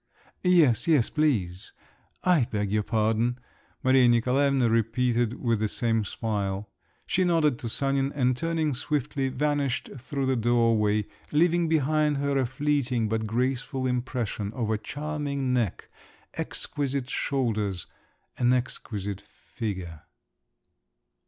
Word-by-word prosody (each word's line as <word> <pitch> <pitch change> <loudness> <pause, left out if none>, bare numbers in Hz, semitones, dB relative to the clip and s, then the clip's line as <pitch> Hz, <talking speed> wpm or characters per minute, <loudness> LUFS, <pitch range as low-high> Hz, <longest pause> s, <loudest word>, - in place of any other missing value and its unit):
"Yes, 170 - +4
yes, 150 -8 +3
please. 105 - 0 0.5
I 175 -9 +4
beg 105 -2 -2
your 105 0 +2
pardon," 115 +2 +1 0.5
Maria 130 -1 +5
Nikolaevna 130 +2 +3
repeated 115 +1 +1
with 115 -3 +1
the 110 - +1
same 115 0 0
smile. 100 -2 -3 0.3
She 185 - +1
nodded 160 -7 +2
to 115 - -4
Sanin, 135 +2 0
and 130 -2 +2
turning 160 +1 0
swiftly, 135 0 -1
vanished 140 -1 -1
through 135 +2 -3
the 130 0 +2
doorway, 115 -3 +2 0.3
leaving 170 +2 +3
behind 155 -1 +2
her 140 0 0
a 130 - +1
fleeting 130 -4 0
but 110 0 -1
graceful 130 +3 -1
impression 120 -5 -2
of 115 -3 -2
a 110 - +1
charming 145 0 -3
neck, 115 -7 -1 0.5
exquisite 140 -2 -3
shoulders, 110 - -1 0.5
an 125 0 +4
exquisite 105 -5 -3
figure. 90 -8 -7
125 Hz, 120 wpm, -27 LUFS, 110-140 Hz, 0.5 s, Maria